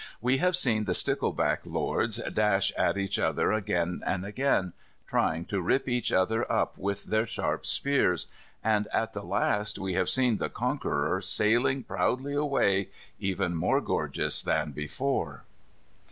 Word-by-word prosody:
We 125 +3 +2
have 180 +4 +2
seen 115 -11 +3
the 90 -3 0
stickleback - - +1
lords - - -1
dash 100 -2 +2
at - - +1
each 100 -1 -1
other - - +1
again 90 -5 -1
and 95 0 -1
again, 105 -4 0 0.3
trying 80 +2 0
to 100 -2 -2
rip 130 +11 +1
each 125 -2 0
other 110 +5 +1
up - - 0
with 100 +1 -3
their 110 +1 0
sharp - - -2
spears, 140 -10 +2 0.4
and, 105 -1 +2
at - - 0
the - - -4
last, 105 0 0
we 95 -1 -3
have 95 0 +1
seen 125 -4 +3
the - - -2
conqueror 75 +6 -1
sailing 120 +7 +2
proudly 135 +3 -1
away, 135 -10 +1 0.3
even 95 -2 -1
more 80 - +2
gorgeous - - -1
than 75 - 0
before. 75 - -3
105 Hz, 150 wpm, -28 LUFS, 95-125 Hz, 0.4 s, seen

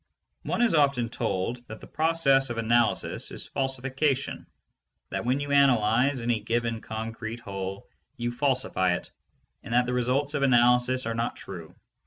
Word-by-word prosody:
One - - -1
is 235 - +3
often 140 -6 +2
told 115 +1 -3
that 110 - -9
the - - -12
process 150 -5 +2
of 120 - -4
analysis 115 +1 +1
is - - -5
falsification, 135 +1 -1 0.6
that - - -3
when 130 +3 +1
you 145 0 -4
analyze 130 -1 +3
any 115 -1 0
given 115 -1 -2
concrete 115 +1 -6
whole 95 -3 -6 0.3
you 120 -1 -2
falsify 120 -8 0
it - - -6 0.5
and 115 - -4
that 125 0 +4
the 125 - -2
results 130 +4 0
of 145 - -1
analysis 125 -1 +4
are 115 - -2
not 115 +1 -2
true. 85 -4 -10
125 Hz, 155 wpm, -27 LUFS, 115-135 Hz, 0.6 s, that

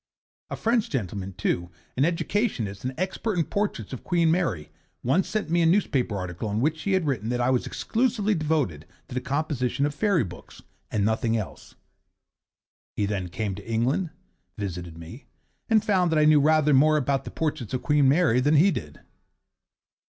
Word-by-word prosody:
A - - -3
French 230 -1 +1
gentleman, 100 -6 -3
too, 85 -1 -1 0.3
an 135 - +3
educationist 165 - -1
and 130 +1 -3
expert 190 +3 -2
in 165 - +3
portraits 200 - -2
of 130 - -7
Queen 170 -2 +2
Mary, 160 - -1 0.3
once 165 +10 +1
sent 215 -7 -2
me 170 0 +3
a - - +3
newspaper 145 - +1
article 90 +3 -4
in 105 +1 -1
which 155 +5 0
he 200 - 0
had 185 -3 +2
written 120 -7 -1
that 125 0 -1
I 125 +1 +2
was 125 - 0
exclusively 225 -3 0
devoted 150 - -1 0.2
to - - -8
the 130 - -1
composition 140 -1 -1
of 145 - -1
fairy 195 - +2
books, 90 -3 -11 0.3
and 100 -2 0
nothing 110 +1 +1
else. 105 - -7 1.2
He 105 - 0
then 95 -3 -3
came 100 +3 -3
to 100 +4 -8
England, 130 +10 +1 0.5
visited 90 -5 -5
me, 85 - -11 0.4
and 220 -2 +3
found 185 -5 +2
that 160 - +2
I 150 - +5
knew 155 -1 +6
rather 155 0 +4
more 155 +3 +5
about 140 -1 0
portraits 145 -8 -2
of 125 - -4
Queen 145 -2 +4
Mary 145 -5 +4
than 145 +4 +3
he 180 +7 +5
did. 75 - -6
140 Hz, 180 wpm, -26 LUFS, 105-170 Hz, 1.2 s, knew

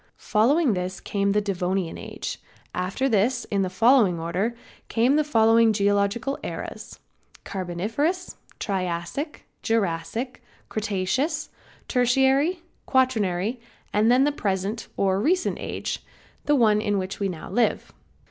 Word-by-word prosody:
Following 260 +5 +3
this 185 0 -3
came 200 -1 0
the 210 +1 +2
Devonian 185 -3 -1
age. - - -6 0.3
After 185 +9 -1
this 235 +2 +1
in 200 -1 +2
the 185 - 0
following 220 -3 +4
order 185 +8 -1 0.3
came 245 +5 +3
the 305 - +3
following 225 -4 +4
geological 205 +6 +1
ages: - - -6 0.5
Carboniferous, 220 - -2 0.2
Triassic, 185 - -3 0.2
Jurassic, 225 +3 -1 0.3
Cretaceous, 225 - -1 0.4
Tertiary, 270 +7 +2 0.2
Quaternary 225 -4 +1 0.3
and 215 +2 +3
then 255 +2 +5
the 295 - +3
present 200 -3 -2
or 195 0 +2
Recent 360 - +1
age, - - -4 0.4
the 295 0 +4
one 215 -5 +4
in 205 -2 0
which 190 0 -4
we 200 -1 0
now 165 -4 -7
live. 240 -1 0
215 Hz, 120 wpm, -25 LUFS, 190-260 Hz, 0.5 s, then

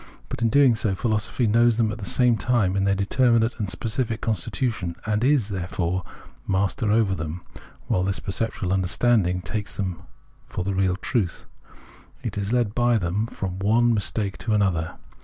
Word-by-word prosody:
But, - - -5
in 115 - +3
doing 135 0 +5
so, 110 -3 0
pliilosophy 110 +3 0
knows 115 +1 +4
them 110 -2 +2
at 110 - -6
the 100 - -5
same 125 +6 +3
time 105 -3 +1
in 100 0 +1
their 100 0 +2
determinate 115 +3 +2
and 100 -3 -2
specific 110 +5 -2
constitution, 110 - -2
and 105 +1 0
is, 130 -6 +3
therefore, 90 -1 -2 0.4
master 100 +3 +1
over 110 -3 +3
them; 80 0 -5 0.4
while 90 - +1
that 95 0 -2
perceptual 95 -1 -2
understanding 95 0 +2
takes 105 +5 -5
them 95 -4 -3 0.4
for 90 - -5
the 100 +1 -2
real 95 -1 +1
truth, 95 -1 -2 0.8
and 115 -3 -4
is 100 +1 -2
led 120 -4 +1
by 120 0 +3
them 100 +3 -1
from 95 -4 -5
one 115 +4 +3
mistake 100 -2 -1
to 110 -2 0
another. 90 -6 0
105 Hz, 170 wpm, -24 LUFS, 95-115 Hz, 0.8 s, doing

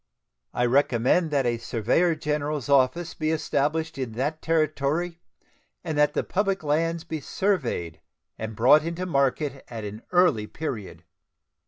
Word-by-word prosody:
I 125 - 0
recommend 130 +5 +2
that 140 -3 +1
a 120 -1 0
surveyor 125 - +1
general's 150 -2 -2
office 140 +5 +2
be 155 0 -2
established 160 0 -1
in 125 -4 -3
that 145 +7 -2
Territory, 160 +2 0 0.6
and 160 -3 -3
that 150 0 +3
the - - +1
public 195 -2 -1
lands 165 +3 0
be 160 -2 -5
surveyed 130 - -1 0.3
and 110 0 -6
brought 130 +7 +6
into 170 +2 -3
market 140 -3 0
at 115 -3 -7
an 105 +2 -7
early 175 -13 +3
period. 115 - -6
150 Hz, 140 wpm, -25 LUFS, 125-165 Hz, 0.6 s, brought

